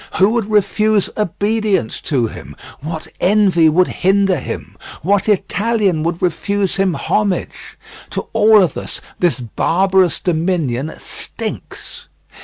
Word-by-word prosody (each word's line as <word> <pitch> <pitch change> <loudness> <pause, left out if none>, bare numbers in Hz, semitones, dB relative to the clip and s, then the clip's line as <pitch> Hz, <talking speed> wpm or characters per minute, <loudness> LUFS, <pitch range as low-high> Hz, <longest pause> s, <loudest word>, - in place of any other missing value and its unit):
Who 195 +3 +4
would 225 -3 -1
refuse 210 0 +2
obedience 210 - -1
to 130 -6 +2
him? 110 - -8 0.2
What 160 +2 -6
envy 185 -5 +4
would 180 +4 +3
hinder 195 -1 +1
him? - - -7 0.3
What 200 +4 +1
Italian 205 -3 +1
would 170 +2 -2
refuse 195 +3 0
him 190 -3 +1
homage? 205 -3 -2 0.3
To - - -4
all 215 -1 +6
of 170 - -1
us - - -3 0.2
this 175 -6 +1
barbarous 185 - +1
dominion 160 -5 -1
stinks. - - -7
190 Hz, 120 wpm, -17 LUFS, 165-205 Hz, 0.3 s, all